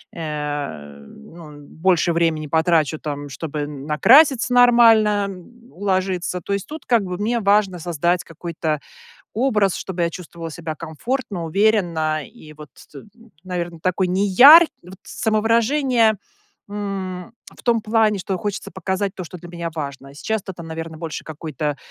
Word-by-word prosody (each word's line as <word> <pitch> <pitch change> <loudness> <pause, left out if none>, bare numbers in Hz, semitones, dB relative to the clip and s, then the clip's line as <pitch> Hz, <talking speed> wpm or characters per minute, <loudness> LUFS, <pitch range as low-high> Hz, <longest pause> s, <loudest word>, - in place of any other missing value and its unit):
э, 145 - -5
ну, 150 - -14
больше 170 +3 0
времени 165 -2 0
потрачу 160 0 +1
там, 145 -1 -5
чтобы 150 +1 -5
н 145 -1 -7
накраситься 250 - +5
нормально, 225 -4 +5
м, 240 +6 -19
уложиться. 185 -2 -2
То 200 - -7
есть 200 -1 -3
тут 310 +2 -9
как 235 -4 +2
бы 180 -1 -5
мне 230 +4 0
важно 200 -3 +2
создать 175 +1 0
какой-то 165 -2 -4 0.5
образ, 215 -6 +1
чтобы 180 -2 -3
я 170 - +1
чувствовала 170 -1 -8
себя 160 -1 -6
комфортно, 175 - -4
уверенно 165 -5 +1
и 155 -10 -15
вот 150 -1 -12 0.2
т 140 - -10 0.4
наверно, 175 -2 -5
такой 185 +1 0
неяркий 205 - +7
вот 180 +2 -12
самовыражение, 230 +1 +1 0.5
м, 195 -1 -5 0.2
в - - -17
том 235 -3 +2
плане, 215 -1 +2
что 190 0 -3
хочется 205 +2 -5
показать 190 +2 -2
то, 185 - -6
что 180 - -10
для 175 0 -12
меня 170 -1 -5
важно. 140 -2 -6
Сейчас-то 195 +5 -4
это, 170 - -10
наверно, 160 0 -7
больше 160 -1 -6
какой-то 150 -1 -4
180 Hz, 145 wpm, -21 LUFS, 160-210 Hz, 0.5 s, неяркий